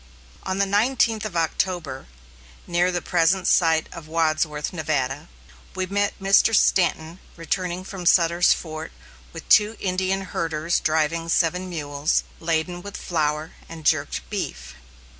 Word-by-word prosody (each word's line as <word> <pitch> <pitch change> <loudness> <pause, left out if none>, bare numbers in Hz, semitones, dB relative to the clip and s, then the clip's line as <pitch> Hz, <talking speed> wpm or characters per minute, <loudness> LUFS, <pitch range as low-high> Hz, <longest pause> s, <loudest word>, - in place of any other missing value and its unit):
On 190 0 -3
the 200 - +2
nineteenth 220 +1 +1
of 190 -5 -4
October, 165 -4 -2 0.6
near 175 +1 +1
the 175 -1 -3
present 180 +1 +2
site 160 -2 +3
of 170 -3 -10
Wadsworth, 155 -1 0
Nevada, 145 -5 -2 0.5
we 185 - -1
met 200 +2 -1
Mr. 195 +3 +4
Stanton 170 -3 +2 0.2
returning 180 +2 -3
from 185 -2 -5
Sutter's 170 0 +4
Fort 160 -1 -3 0.4
with 165 - -10
two 210 +1 +4
Indian 190 0 -1
herders 165 -3 -1
driving 160 +1 0
seven 180 +2 +1
mules, 145 -3 -1 0.2
laden 165 +2 -1
with 200 +2 -8
flour 155 -2 -1 0.2
and 160 -2 -10
jerked - - 0
beef. - - -5
170 Hz, 130 wpm, -23 LUFS, 160-185 Hz, 0.6 s, Mr